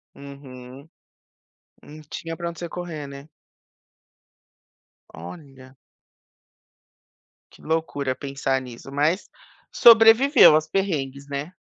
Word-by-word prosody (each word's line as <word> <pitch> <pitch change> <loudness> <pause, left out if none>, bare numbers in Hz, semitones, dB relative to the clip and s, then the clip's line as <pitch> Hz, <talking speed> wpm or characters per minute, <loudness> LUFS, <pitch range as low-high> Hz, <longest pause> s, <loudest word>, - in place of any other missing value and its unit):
Uhum. 140 0 -13 0.9
Não 155 +1 -13
tinha 165 0 -7
para 170 -1 -5
onde 170 - -13
você 170 - -6
correr, 165 -5 -7
né. 140 +2 -12 1.9
Olha. 130 - -13 1.8
Que - - -20
loucura 150 -5 -3
pensar 135 -1 -3
nisso 125 +2 -12
mas, 150 +7 -1 0.4
sobreviveu 230 - +6
aos 155 0 0
perrengues, 145 -8 -3
né. 140 +4 -6
145 Hz, 95 wpm, -22 LUFS, 135-170 Hz, 1.9 s, sobreviveu